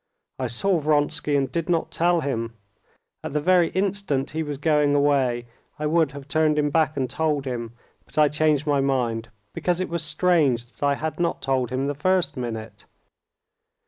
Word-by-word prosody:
"I 130 - -1
saw 175 - +1
Vronsky 150 0 +1
and 135 -1 0
did 170 0 -2
not 170 -2 0
tell 170 0 +2
him. 115 -5 -3 0.7
At - - -5
the 150 - +1
very 175 +2 +3
instant 190 -8 -1
he 160 - -2
was 145 -2 -4
going 150 -1 +2
away 135 -4 +2 0.3
I 150 - -3
would 155 -2 +2
have 140 -1 -9
turned 155 +1 +2
him 145 -1 +1
back 155 -1 +1
and 130 -2 0
told 145 +1 -1
him, 120 -3 -4 0.3
but - - -20
I 150 -1 +6
changed 150 0 +1
my 145 -2 +2
mind, 120 -4 -1 0.2
because 180 -1 -1
it 185 - -2
was 170 -1 -2
strange 155 -6 +2
that - - -28
I 140 0 +3
had 155 +3 -4
not 170 -1 -1
told 130 -3 0
him 130 +2 -1
the 145 - -1
first 185 +5 +1
minute. 110 -4 -6
145 Hz, 185 wpm, -24 LUFS, 135-160 Hz, 0.7 s, I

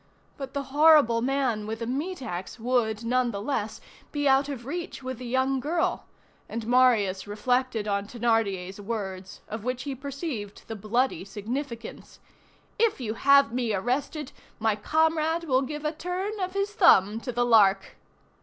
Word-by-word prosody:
But 270 0 -8
the 280 - -1
horrible 295 -7 +6
man 250 -5 0
with 220 +1 -3
the 230 - -4
meat 285 +6 -3
axe 180 +3 -6
would, 230 -2 0
nonetheless, 230 -2 -1 0.3
be 290 -1 0
out 270 +1 +4
of 250 -5 -6
reach 335 -1 -5
with 260 -1 -5
the 250 - -6
young 260 +2 +1
girl, 330 +5 -1 0.4
and 230 -1 -4
Marius 225 -6 +3
reflected 240 +1 0
on 200 0 -1
Thénardier's 210 -5 -1
words, 195 -3 -5
of 220 -1 -6
which 250 +1 -2
he 280 - -4
perceived 270 - -6
the 225 - -5
bloody 220 0 0
significance: 230 +5 -6 0.6
"If 455 -7 +2
you 220 -4 -3
have 280 0 +5
me 240 -4 0
arrested, 255 +7 -2 0.3
my 220 -1 +1
comrade 320 +5 +1
will 265 -5 +2
give 295 +3 -5
a 300 - +1
turn 370 +6 -4
of 370 -1 -2
his 395 +1 -1
thumb 220 - +5
to 250 +2 -5
the 245 0 +1
Lark." 200 -4 +4
250 Hz, 155 wpm, -27 LUFS, 220-280 Hz, 0.6 s, horrible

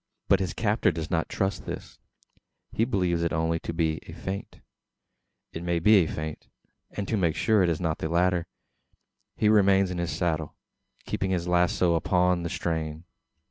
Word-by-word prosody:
But - - +5
his 90 -5 -3
captor 110 -3 +2
does 80 -1 -5
not - - 0
trust 95 -2 -1
to - - -14
this. - - -7 0.7
He 115 - +1
believes 90 -7 0
it 85 - +1
to 80 +1 0
be 85 -1 +1
only 80 0 -2
a - - -8
faint 95 +1 -6 0.9
it 80 - -5
may 85 0 0
be 105 +6 +6
a 90 -5 +3
feint 80 0 -6 0.4
and 100 -1 -5
to 115 - 0
make 85 -6 +1
sure 110 -3 +3
it 90 - +3
is 80 - -1
not 80 -3 -1
the 80 - -2
latter, 85 0 +1 0.9
he 110 - +1
remains 100 -3 +4
in 90 - -3
his 85 0 -1
saddle, 80 -4 -2 0.5
keeping 95 - -2
his 90 -2 -1
lazo 90 0 +2
upon 90 +1 +2
the 85 - -3
strain. 80 -2 -3
85 Hz, 180 wpm, -27 LUFS, 80-95 Hz, 0.9 s, be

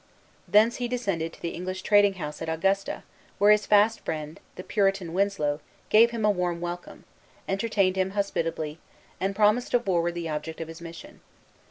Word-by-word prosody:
Thence 220 +3 +4
he 245 - -2
descended 195 -10 -2
to - - -16
the 170 - -2
English 185 +1 -5
trading 205 -1 +4
house 150 -4 -6
at - - -3
Augusta, 195 +5 0 0.3
where 205 +1 +6
his 210 -1 +3
fast 215 +2 +4
friend, 155 -1 -5 0.2
the 185 - -7
Puritan 195 -5 0
Winslow, 185 -7 0 0.3
gave 230 +2 +6
him 230 -2 -2
a 210 - +5
warm 180 -3 -1
welcome, 175 0 -6 0.4
entertained 195 -1 +1
him 190 0 +1
hospitably, 165 -5 -2 0.4
and 195 +1 -1
promised 215 +4 +3
to 245 - +5
forward 175 -6 0
the 170 -1 -3
object 155 +1 -4
of 165 -1 -5
his 165 +1 -10
mission. 165 0 -11
190 Hz, 175 wpm, -26 LUFS, 165-205 Hz, 0.4 s, where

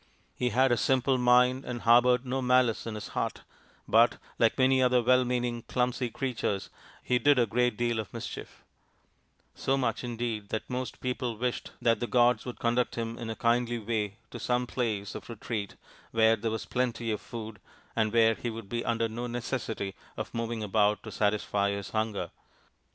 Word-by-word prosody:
He 125 - 0
had 130 +3 +3
a 120 - +3
simple 130 +2 +2
mind 125 +1 +4
and 120 -2 -5
harboured 125 +2 +5
no 130 +1 -1
malice 125 -3 +2
in 110 - -4
his 105 - -6
heart, - - -3 0.4
but, - - +5 0.2
like 115 -1 +3
many 130 0 +4
other 125 -1 +4
well 125 +1 +5
meaning, 120 -1 -1
clumsy 125 0 0
creatures, 115 -5 -2 0.3
he 125 -1 +2
did 145 0 +4
a 120 - +4
great 120 0 +1
deal 120 -1 0
of 110 - -5
mischief; - - -7 0.9
so 135 +1 0
much 130 - -1
indeed 115 -4 -3
that 110 - -3
most 125 0 -4
people 125 -2 -2
wished 125 +1 -2
that 115 -1 +2
the 120 - -2
gods 120 0 +3
would 125 - -6
conduct 120 +1 +1
him 115 -1 -3
in 115 -2 -5
a 110 - -3
kindly 120 0 +1
way 105 -2 -2
to - - -7
some 125 0 0
place 110 -6 -2
of - - -8
retreat 110 -3 -4 0.3
where 115 0 +4
there 115 +1 -2
was 110 0 -3
plenty 120 -2 -1
of 105 - -2
food 110 -3 -7 0.4
and 110 -2 +1
where 115 0 +5
he 120 - -4
would 115 -3 -7
be 120 0 -2
under 115 -1 0
no 120 +2 -5
necessity 120 -4 -3 0.2
of - - -5
moving 115 -1 -3
about 105 0 +2
to - - -8
satisfy 100 -1 +1
his 100 -1 -4
hunger. 110 -2 -2
120 Hz, 185 wpm, -29 LUFS, 110-125 Hz, 0.9 s, harboured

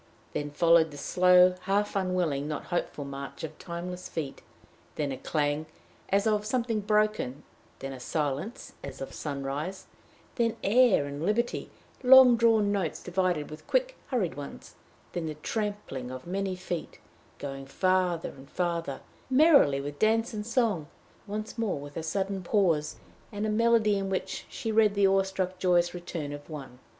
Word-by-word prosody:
Then 145 0 -2
followed 165 +2 +4
the 145 - -10
slow, 180 +3 +5
half 205 +2 +1
unwilling, 180 -7 0
not 150 -1 -3
hopeful 150 -4 -2
march 140 +1 -7
of 155 -1 -7
timeless 180 +1 -6
feet; 150 -4 -5 0.5
then 145 -2 -1
a 130 - -4
clang 150 0 -1 0.4
as 200 +1 +2
of 210 -1 +2
something 230 0 0
broken, 210 - 0 0.3
then 135 0 -6
a 130 - -8
silence 150 - -3
as 135 -1 -7
of 135 - -6
sunrise, 145 +5 -4 0.5
then 230 -2 +1
air 220 - +5
and 145 +2 -5
liberty 230 +6 0 0.3
long 255 -1 +9
drawn 225 -3 +4
notes 195 -6 -2
divided 180 -4 0
with 155 - -10
quick, - - +1
hurried 230 - 0
ones; 145 -1 -9 0.4
then 170 -2 -2
the 155 - -4
trampling 200 - -4
of 130 0 -7
many 190 +1 -2
feet, 180 -2 -5 0.4
going 135 -1 -6
farther 180 +2 +1
and 135 +1 -14
farther 170 -6 -2 0.3
merrily, 270 - +6
with 145 +1 -6
dance 225 +2 +2
and 210 0 -4
song; 225 - +1 0.4
once 215 +3 -5
more 145 -11 -2
a - - -3
sudden 190 +4 -2
pause 170 -6 +1 0.4
and 205 0 -3
a - - 0
melody 220 -2 +3
in 195 0 -3
which 190 - -3
she 225 -4 -4
read 215 -2 +4
the 200 -1 +4
awe 195 0 +5
struck 190 -1 -3
joyous 175 -1 +3
return 170 -4 -5
of 145 +2 -9
one. 135 -5 -8
180 Hz, 160 wpm, -28 LUFS, 150-210 Hz, 0.5 s, long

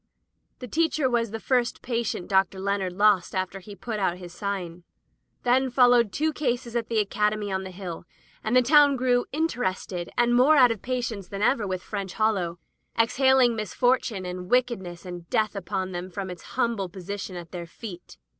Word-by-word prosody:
The 250 - -8
teacher 315 +1 +1
was 235 -2 +1
the 225 +2 -5
first 245 -1 0
patient 230 -7 -2
Dr. 190 -1 +2
Leonard 195 -2 -1
lost 200 -2 +3
after 185 +1 -2
he 200 +2 -11
put 215 +3 -4
out 180 -3 0
his 175 -2 -10
sign. 180 -4 -4 0.6
Then 260 +2 +3
followed 245 -3 +5
two 310 +9 0
cases 245 -5 -2
at 230 -1 -1
the 230 - 0
Academy 210 0 0
on 190 0 -1
the 190 - -6
Hill, 180 -3 -7 0.4
and 220 +3 0
the 255 - +6
town 285 +2 +6
grew 245 -1 +1
interested 200 - -2
and 240 0 +3
more 260 +6 +6
out 250 -4 +6
of 225 - -4
patience 240 -6 -3
than 200 +2 -4
ever 220 -3 +2
with 185 -1 -3
French 195 -3 -5
Hollow, 195 -6 0 0.4
exhaling 255 +1 +4
misfortune, 220 -1 0
and 180 0 -6
wickedness, 220 -9 0
and 175 -2 -8
death 215 -3 +1
upon 190 0 -3
them, 175 +1 -5
from 190 0 -5
its 180 +6 -11
humble 230 -7 0
position 190 +1 -6
at 170 -1 -8
their 175 -2 -6
feet. 180 -1 -10
210 Hz, 180 wpm, -26 LUFS, 185-245 Hz, 0.6 s, the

